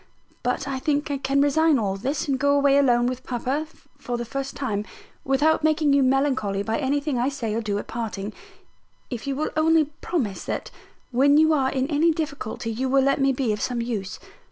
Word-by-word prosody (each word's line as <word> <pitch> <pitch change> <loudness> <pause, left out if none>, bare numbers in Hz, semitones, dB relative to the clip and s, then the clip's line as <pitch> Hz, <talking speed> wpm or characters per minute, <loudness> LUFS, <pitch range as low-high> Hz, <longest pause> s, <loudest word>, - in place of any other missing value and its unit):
But 250 +2 -1
I 270 -1 -2
think 290 +1 -1
I 280 - -2
can 275 +1 +1
resign 310 +1 +3
all 200 -4 -1
this, 270 +10 -2
and 270 -2 0
go 285 +1 +3
away 280 -1 +4
alone 240 -3 +3
with 255 +1 -3
papa, 260 +5 -2 0.3
for 245 -1 -3
the 240 - -4
first 275 +3 -5
time, 210 -7 -2 0.4
without 295 +4 +2
making 310 -2 +3
you 280 - +4
melancholy 260 -7 +1
by 220 +2 -1
anything 285 -1 0
I 250 +3 +1
say 240 -6 -3
or 225 - -1
do 205 -2 -2
at - - -4
parting, 215 -3 -5 0.8
if 245 +1 -5
you 275 - -1
will 305 +3 -2
only 315 0 +4 0.2
promise 240 - -2
that - - -4 0.4
when 280 +4 +4
you 315 +1 +5
are 270 -3 +2
in 265 -1 0
any 315 +3 +3
difficulty 285 -8 -4
you 255 +4 -2
will 270 0 +4
let 275 0 +2
me 275 0 +4
be 255 -4 0
of 210 - -5
some 245 -2 -1
use. 225 -5 -3
270 Hz, 205 wpm, -24 LUFS, 240-285 Hz, 0.8 s, you